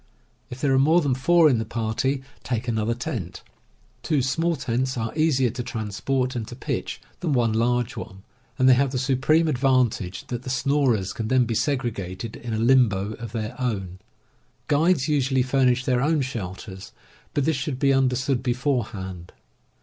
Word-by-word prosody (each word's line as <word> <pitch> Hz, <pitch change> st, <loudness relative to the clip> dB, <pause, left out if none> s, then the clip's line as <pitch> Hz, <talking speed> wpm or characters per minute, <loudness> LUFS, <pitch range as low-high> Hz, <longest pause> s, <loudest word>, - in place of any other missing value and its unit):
If 125 Hz, -, -8 dB
there 140 Hz, -2 st, +2 dB
are 130 Hz, -, +4 dB
more 160 Hz, +5 st, +5 dB
than 145 Hz, -6 st, +1 dB
four 160 Hz, +6 st, +4 dB
in 125 Hz, -6 st, +3 dB
the -, -, -1 dB
party, 115 Hz, +5 st, -2 dB, 0.2 s
take 120 Hz, -1 st, -3 dB
another 115 Hz, 0 st, 0 dB
tent. 95 Hz, -7 st, -5 dB, 0.6 s
Two 150 Hz, -5 st, +1 dB
small 165 Hz, +6 st, 0 dB
tents 130 Hz, -1 st, -2 dB
are 115 Hz, +2 st, -3 dB
easier 140 Hz, -6 st, +2 dB
to 125 Hz, -, -5 dB
transport 125 Hz, +3 st, -2 dB
and 115 Hz, -3 st, -3 dB
to 120 Hz, -, -8 dB
pitch 130 Hz, -, -4 dB, 0.2 s
than 165 Hz, -5 st, -1 dB
one 120 Hz, -4 st, +2 dB
large 120 Hz, +1 st, +1 dB
one, 95 Hz, 0 st, -8 dB, 0.3 s
and 130 Hz, -2 st, +3 dB
they 130 Hz, -, +8 dB
haye 135 Hz, +3 st, +3 dB
the 130 Hz, 0 st, -3 dB
supreme 135 Hz, +5 st, +2 dB
advantage 125 Hz, -, +1 dB
that 120 Hz, -1 st, -3 dB
the 130 Hz, -, -7 dB
snorers 130 Hz, -6 st, +1 dB
can 110 Hz, -, -4 dB
then 130 Hz, +1 st, +3 dB
be 115 Hz, -, -2 dB
segregated 115 Hz, -, -2 dB
in 120 Hz, -, -7 dB
a -, -, -1 dB
limbo 110 Hz, -4 st, +3 dB
of 115 Hz, -2 st, -7 dB
their 110 Hz, 0 st, -4 dB
own. 95 Hz, -7 st, -3 dB, 0.7 s
Guides 150 Hz, -1 st, +2 dB
usually 135 Hz, -3 st, +2 dB
furnish 130 Hz, -1 st, +2 dB
their 125 Hz, -2 st, +1 dB
own 150 Hz, +1 st, +2 dB
shelters, 95 Hz, -5 st, -6 dB, 0.4 s
but 145 Hz, -, +1 dB
this 160 Hz, 0 st, +2 dB
should 130 Hz, 0 st, -3 dB
be 135 Hz, +1 st, +3 dB
understood 130 Hz, 0 st, +1 dB
beforehand. 110 Hz, -, -2 dB
125 Hz, 170 wpm, -24 LUFS, 115-135 Hz, 0.7 s, they